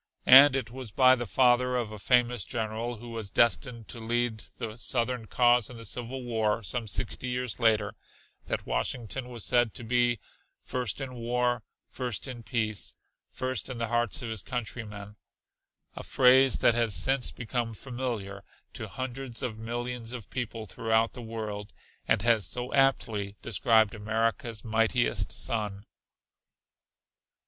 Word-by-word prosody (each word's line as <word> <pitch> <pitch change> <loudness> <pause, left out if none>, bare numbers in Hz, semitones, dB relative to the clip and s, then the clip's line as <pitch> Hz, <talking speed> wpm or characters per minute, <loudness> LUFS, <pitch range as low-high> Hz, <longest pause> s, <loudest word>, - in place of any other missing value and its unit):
And 135 +2 +9
it 130 -3 -2
was 130 -2 -7
by 130 +4 +6
the 120 -2 -1
father 125 +1 +3
of 120 -4 -1
a 105 - -8
famous 120 0 +2
general 115 0 -3
who 120 +2 -10
was 115 -3 -4
destined 115 0 +2
to 120 - -4
lead 115 -1 -1
the 110 -3 -5
southern 120 -1 -1
cause 120 -1 +3
in 125 - -10
the 115 - -9
Civil 125 +4 -5
War 110 -2 0
some 115 +3 -3
sixty 105 +6 -2
years 125 -1 -2
later 110 -3 +3 0.5
that - - -3
Washington 120 - -2
was 120 -4 -6
said 120 -3 +2
to - - -5
be 120 0 +2 0.4
"first 125 +1 -2
in 130 -1 -5
war, 120 0 0 0.3
first 125 -1 -3
in 125 -2 -7
peace, 110 -3 -2 0.3
first 130 -5 -2
in 130 - -5
the 115 -1 -2
hearts 120 +4 0
of 115 - -4
his 110 -3 -3
countrymen," 105 -3 -5 0.8
a - - -6
phrase 130 0 +5
that - - +4
has 115 -3 +2
since 135 -2 +2
become 120 -1 -3
familiar 115 -6 -5 0.3
to - - -6
hundreds 130 -2 -5
of 110 -3 -3
millions 120 +1 -4
of 120 -6 -8
people 115 -3 -4
throughout 110 +1 0
the 125 - -8
world, 110 -3 -6 0.3
and 100 - +2
has 115 -3 +3
so 125 +1 -4
aptly 110 -7 +1
described 110 -2 +3
America's 115 +2 -1
mightiest 115 +2 +1
son. 105 -3 -2
120 Hz, 150 wpm, -28 LUFS, 110-125 Hz, 0.8 s, And